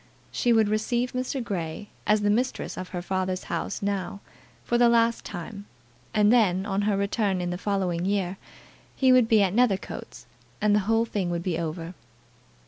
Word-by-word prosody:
She 245 Hz, -, +1 dB
would 220 Hz, -2 st, +4 dB
receive 235 Hz, +4 st, 0 dB
Mr. 255 Hz, +1 st, -2 dB
Grey 180 Hz, -1 st, -4 dB, 0.2 s
as 210 Hz, 0 st, +4 dB
the 205 Hz, 0 st, +2 dB
mistress 250 Hz, +4 st, -1 dB
of 185 Hz, -, -6 dB
her 175 Hz, -2 st, -5 dB
father's 185 Hz, 0 st, -2 dB
house 170 Hz, +4 st, -3 dB
now, 200 Hz, -1 st, -2 dB, 0.4 s
for 240 Hz, -, 0 dB
the 240 Hz, -1 st, +6 dB
last 230 Hz, 0 st, +3 dB
time; 200 Hz, +4 st, -7 dB, 0.4 s
and 210 Hz, +1 st, +4 dB
then, 195 Hz, -5 st, +3 dB
on 200 Hz, -1 st, -1 dB
her 200 Hz, -, +1 dB
return 200 Hz, -1 st, 0 dB
in 175 Hz, 0 st, -2 dB
the -, -, -2 dB
following 185 Hz, -4 st, -1 dB
year, 195 Hz, -1 st, -1 dB, 0.6 s
he 260 Hz, -1 st, +4 dB
would 250 Hz, -3 st, +5 dB
be 220 Hz, -2 st, +5 dB
at 190 Hz, -2 st, 0 dB
Nethercoats, 225 Hz, -4 st, -1 dB, 0.3 s
and 210 Hz, -1 st, +3 dB
the 210 Hz, -, +4 dB
whole 225 Hz, +1 st, +3 dB
thing 200 Hz, -5 st, -2 dB
would 170 Hz, 0 st, -2 dB
be 175 Hz, -3 st, -1 dB
over. 165 Hz, +1 st, -4 dB
200 Hz, 180 wpm, -26 LUFS, 185-225 Hz, 0.6 s, the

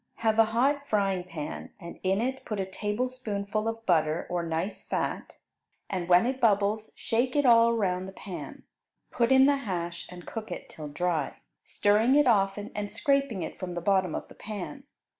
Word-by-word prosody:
Have 225 Hz, -1 st, +1 dB
a 225 Hz, -, +8 dB
hot 275 Hz, +6 st, +1 dB
frying 195 Hz, -5 st, +1 dB
pan, 160 Hz, -4 st, -7 dB
and 170 Hz, -3 st, -9 dB
in 190 Hz, +2 st, +1 dB
it 265 Hz, +2 st, -2 dB
put 215 Hz, -2 st, -4 dB
a 190 Hz, -, 0 dB
tablespoonful 215 Hz, 0 st, -2 dB
of 225 Hz, 0 st, -4 dB
butter 160 Hz, -2 st, +2 dB
or 175 Hz, -1 st, 0 dB
nice 165 Hz, +4 st, -3 dB
fat, -, -, -3 dB, 0.5 s
and 180 Hz, -2 st, -2 dB
when 180 Hz, +4 st, +6 dB
it 260 Hz, +1 st, -2 dB
bubbles 210 Hz, -1 st, +2 dB
shake 245 Hz, +4 st, 0 dB
it 290 Hz, -1 st, +3 dB
all 230 Hz, -1 st, +7 dB
around 190 Hz, -5 st, 0 dB
the -, -, -7 dB
pan. 190 Hz, -1 st, -8 dB, 0.5 s
Put 235 Hz, +1 st, +1 dB
in 265 Hz, 0 st, +7 dB
the 285 Hz, 0 st, +4 dB
hash 175 Hz, -9 st, -4 dB
and 175 Hz, -1 st, -10 dB
cook 220 Hz, -4 st, -6 dB
it -, -, -6 dB
till 155 Hz, -1 st, -8 dB
dry, 170 Hz, +2 st, -1 dB, 0.3 s
stirring 215 Hz, +6 st, +3 dB
it 295 Hz, 0 st, +5 dB
often 205 Hz, -2 st, +2 dB
and 205 Hz, 0 st, -4 dB
scraping 260 Hz, -, +1 dB
it -, -, -7 dB
from 180 Hz, -2 st, -5 dB
the -, -, -1 dB
bottom 190 Hz, -2 st, +2 dB
of -, -, -5 dB
the -, -, -14 dB
pan. 215 Hz, +7 st, -7 dB
205 Hz, 185 wpm, -28 LUFS, 180-235 Hz, 0.5 s, a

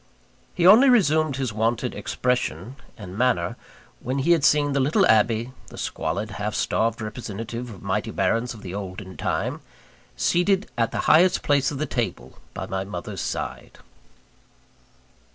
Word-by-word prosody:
He 175 Hz, -, +1 dB
only 225 Hz, +9 st, +8 dB
resumed 155 Hz, -, +3 dB
his 130 Hz, -4 st, -2 dB
wonted 115 Hz, +3 st, 0 dB
expression 125 Hz, -, -2 dB, 0.2 s
and 95 Hz, -3 st, -9 dB
manner, 115 Hz, -7 st, +1 dB, 0.4 s
when 130 Hz, +3 st, -3 dB
he 145 Hz, +5 st, +2 dB
had 165 Hz, -4 st, +4 dB
seen 145 Hz, -1 st, +3 dB
the 140 Hz, -, +1 dB
little 155 Hz, +9 st, +3 dB
Abbe 115 Hz, +1 st, +3 dB, 0.2 s
the -, -, -12 dB
squalid, 100 Hz, +7 st, -3 dB
half 105 Hz, 0 st, -4 dB
starved 115 Hz, +1 st, 0 dB
representative 115 Hz, +2 st, -6 dB
of 105 Hz, -4 st, -11 dB
mighty 105 Hz, +3 st, -1 dB
barons 115 Hz, +2 st, 0 dB
of 105 Hz, -, -13 dB
the 90 Hz, -, -7 dB
olden 95 Hz, -1 st, -7 dB
time -, -, -2 dB, 0.6 s
seated 190 Hz, +3 st, +1 dB
at 115 Hz, -1 st, 0 dB
the -, -, -2 dB
highest 180 Hz, +4 st, +5 dB
place 140 Hz, -2 st, +2 dB
of 145 Hz, -, -5 dB
the 155 Hz, -, -1 dB
table 120 Hz, -4 st, -4 dB, 0.2 s
by -, -, -4 dB
my 95 Hz, 0 st, -3 dB
mother's 100 Hz, +2 st, -6 dB
side. -, -, -5 dB
120 Hz, 155 wpm, -24 LUFS, 105-145 Hz, 0.6 s, only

